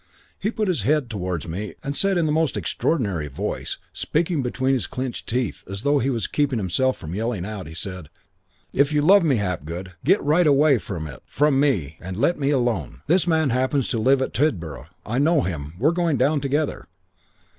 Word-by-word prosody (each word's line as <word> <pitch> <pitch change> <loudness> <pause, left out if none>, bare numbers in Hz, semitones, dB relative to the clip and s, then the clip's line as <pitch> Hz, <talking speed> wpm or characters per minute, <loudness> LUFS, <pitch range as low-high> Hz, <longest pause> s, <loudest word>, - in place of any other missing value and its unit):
"He 205 - 0
put 220 -2 -1
his 175 - +1
head 135 +2 +1
towards 90 -6 -3
me 95 +6 -5
and 140 +1 -3
said 195 +2 +2
in 170 - +2
the 155 - +1
most 160 0 +1
extraordinary 100 - -1
voice, 70 - -4 0.2
speaking 160 -1 0
between 130 +1 0
his 130 - 0
clenched 130 -1 -5
teeth 125 -2 -1
as 100 +2 -5
though 145 0 +3
he 135 - 0
was 115 -5 -1
keeping 145 -4 0
himself 110 +7 +1
from 80 +1 -7
yelling 110 -2 -2
out, 105 -4 -6
he 80 - -10
said, 90 -2 -6 0.6
'If 140 +2 +3
you 150 -1 +2
love 195 +4 +6
me, 150 -5 +3
Hapgood, 90 -2 -3
get 190 +9 +4
right 155 +4 +3
away 145 +1 +5
out 120 -1 -2
of 85 -6 -3
it 70 -5 -9
from 145 -2 +2
me 90 - 0
and 95 +1 -6
let 145 +9 +1
me 140 -1 +1
alone. 115 - 0
This 180 +3 +3
man 160 -5 +2
happens 130 +2 +1
to 115 - 0
live 130 +4 +3
at - - -4
Tidborough. 90 - -1 0.2
I 120 +4 -1
know 155 +1 +4
him. 80 - -4
We're 140 - +3
going 170 -4 +1
down 140 +3 +2
together.' 145 +2 -1
130 Hz, 205 wpm, -23 LUFS, 95-150 Hz, 0.6 s, love